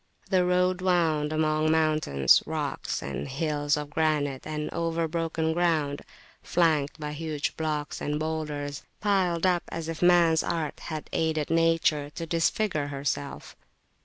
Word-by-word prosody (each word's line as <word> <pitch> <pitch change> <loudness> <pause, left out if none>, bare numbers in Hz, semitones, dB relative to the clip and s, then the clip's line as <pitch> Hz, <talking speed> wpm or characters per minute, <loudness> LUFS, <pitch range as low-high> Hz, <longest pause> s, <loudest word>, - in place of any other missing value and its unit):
The 185 -1 +4
road 180 0 +2
wound 165 -5 +2
among 155 0 +1
mountains, 155 - +3
rocks - - -3
and 70 - -4
hills 145 +1 0
of 150 -1 -5
granite, 145 -3 0
and 150 -1 -3
over 165 0 -1
broken 160 0 -1
ground, 160 -5 +1 0.4
flanked 155 -3 +1
by 150 -1 -4
huge 155 -1 -3
blocks 150 -2 -3
and 150 +1 -1
boulders 150 -3 -3 0.2
piled 190 -4 +1
up 180 -2 +3
as 165 -1 -5
if 165 -1 -5
man's 175 -2 +5
art 165 -3 -3
had 155 -2 -6
aided 160 -2 0
Nature 165 -3 +2
to 165 - -4
disfigure 165 -1 0
herself. 140 - -4
155 Hz, 135 wpm, -27 LUFS, 150-165 Hz, 0.4 s, man's